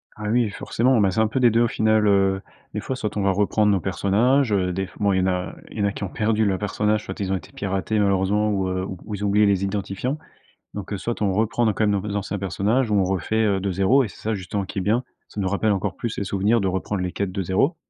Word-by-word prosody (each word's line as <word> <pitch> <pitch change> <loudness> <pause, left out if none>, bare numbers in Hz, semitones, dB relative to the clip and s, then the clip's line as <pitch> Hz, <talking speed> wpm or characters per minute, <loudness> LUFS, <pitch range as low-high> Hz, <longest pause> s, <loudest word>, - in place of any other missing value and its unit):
Ah 105 -1 -4
oui, 120 -1 +2
forcément. 120 +4 +1
Ben, 95 -2 +3
c'est 105 - -1
un 110 - +4
peu 115 +5 -1
des 120 -2 +6
2 115 +2 +3
au 120 - +4
final, 110 -1 +2
heu. 95 -1 +3 0.3
Des - - -2
fois, 130 - -3
soit 105 -4 -4
on 105 - 0
va 100 0 +3
reprendre 105 +2 +2
nos 100 - +2
personnages, 110 +8 +2
heu, 90 -3 +1
des 95 +1 -2
f - - -18
bon 100 -1 +2
il 95 - +2
y - - +2
en 95 - +1
a 90 -1 -2 0.2
il 110 - -7
y - - +1
en - - +2
a 100 - +1
qui 100 - -6
ont 100 - -3
perdu 110 0 +1
leurs 95 -2 0
personnages, 105 +1 0
soit 95 - -7
ils 95 -2 -2
ont - - +2
été - - -12
piratés 100 +2 -2
malheureusement 100 +2 +2
ou, 95 -2 0
heu, 95 0 -2 0.2
ou 105 - -4
ils 100 - -6
ont - - +1
oublié 105 +1 +4
les 100 -1 +2
identifiants. 100 +7 -2 0.6
Donc, 105 0 -6
heu, - - -1
soit 115 +4 -4
on 100 -2 +2
reprend 110 +3 +1
nos, 110 - +2
quand 110 - +1
même, 100 -1 +2
nos 105 +1 -4
anciens 100 0 -3
personnages 105 +6 0
ou - - +2
on 95 - +3
refait, 95 +4 0
heu, 100 -2 +1
de 100 - -1
0 110 +9 +3
et - - -4
c'est - - -14
ça, 110 +1 -1
justement, 100 +1 -3
qui 100 +2 -6
est - - +1
bien, 115 +6 +1 0.2
ça 105 - -6
nous 95 - 0
rappelle 105 +2 +1
encore 95 -2 -2
plus 115 -3 -4
les 100 - -2
souvenirs 100 +4 +1
de 95 - 0
reprendre 95 +1 -2
les 90 -1 -3
quêtes 100 -2 -2
de 95 0 -2
0 100 - +1
100 Hz, 295 wpm, -23 LUFS, 95-110 Hz, 0.6 s, des